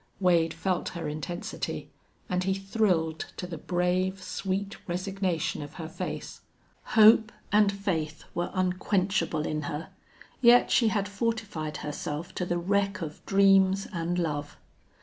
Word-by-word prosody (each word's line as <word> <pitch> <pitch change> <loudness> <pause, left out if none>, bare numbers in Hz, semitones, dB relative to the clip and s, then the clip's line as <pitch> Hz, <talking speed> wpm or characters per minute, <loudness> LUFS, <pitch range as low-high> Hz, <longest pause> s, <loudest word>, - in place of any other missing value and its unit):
Wade 170 -3 +3
felt 185 -2 -1
her 165 -2 -3
intensity, 155 +4 -4 0.4
and 180 0 0
he 190 0 +1
thrilled 195 -5 0
to - - -4
the 170 -3 -6
brave, 180 +2 0
sweet 195 +2 -3
resignation 185 -3 -1
of 145 - -8
her 165 -3 -6
face. 160 - -6 0.6
Hope 220 +1 +7 0.2
and 205 0 +5
faith 170 -6 -2
were 175 0 -1
unquenchable 185 -3 0
in 155 0 -2
her, 150 +3 -5 0.5
yet 245 0 +6
she 235 - +4
had 205 -2 +1
fortified 200 -7 -2
herself 150 +2 -4
to 180 - -3
the 175 - 0
wreck 195 +1 0
of 150 -1 -7
dreams 195 0 +4
and 170 0 -1
love. 145 -4 -2
185 Hz, 135 wpm, -28 LUFS, 165-195 Hz, 0.6 s, Hope